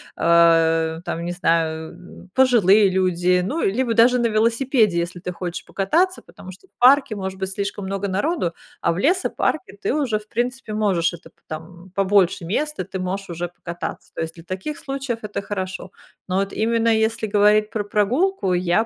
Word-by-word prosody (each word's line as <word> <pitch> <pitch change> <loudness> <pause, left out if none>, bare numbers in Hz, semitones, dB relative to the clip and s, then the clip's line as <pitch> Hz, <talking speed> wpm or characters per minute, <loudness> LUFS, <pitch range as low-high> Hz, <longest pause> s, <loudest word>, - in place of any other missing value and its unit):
а, 165 -1 +3
там, 170 -1 -4
не 175 - -3
знаю, 160 -3 0
м, 180 +1 -14
пожилые 220 -6 +5
люди, 180 -1 +2
ну 295 - -2
либо 230 +4 +1
даже 245 +2 +5
на 235 - +2
велосипеде, 225 -3 +2
если 175 +1 -4
ты 180 0 -5
хочешь 175 0 -5
покататься, 340 - 0
потому 185 - -12
что 190 - -16
в - - -51
парке 260 -2 +5
может 190 -1 -5
быть 190 0 -3
слишком 200 0 -4
много 195 +1 -3
народу, 195 - -1 0.3
а 170 - +1
в - - -6
лесопарке 310 - 0
ты - - 0
уже, 265 -8 0
в 210 0 -19
принципе, 245 -1 -3
можешь 190 -6 +1
это 170 - -12
по - - -38
там 170 +3 -9
побольше 195 -2 +2
места, 300 - -2
ты 190 -1 -6
можешь 190 +1 -4
уже 170 +1 -4
покататься. 175 0 -7
То - - -3
есть 160 +1 -4
для 165 - -13
таких 190 - -5
случаев 270 -4 -4
это 210 -1 -4
хорошо. 190 -2 -5 0.4
Но 185 - 0
вот 195 0 -1
именно 230 +1 +1
если 220 0 +1
говорить 210 +1 +3
про 220 -2 -2
прогулку, 210 - +1
я 180 +5 +2
195 Hz, 180 wpm, -22 LUFS, 175-230 Hz, 0.4 s, пожилые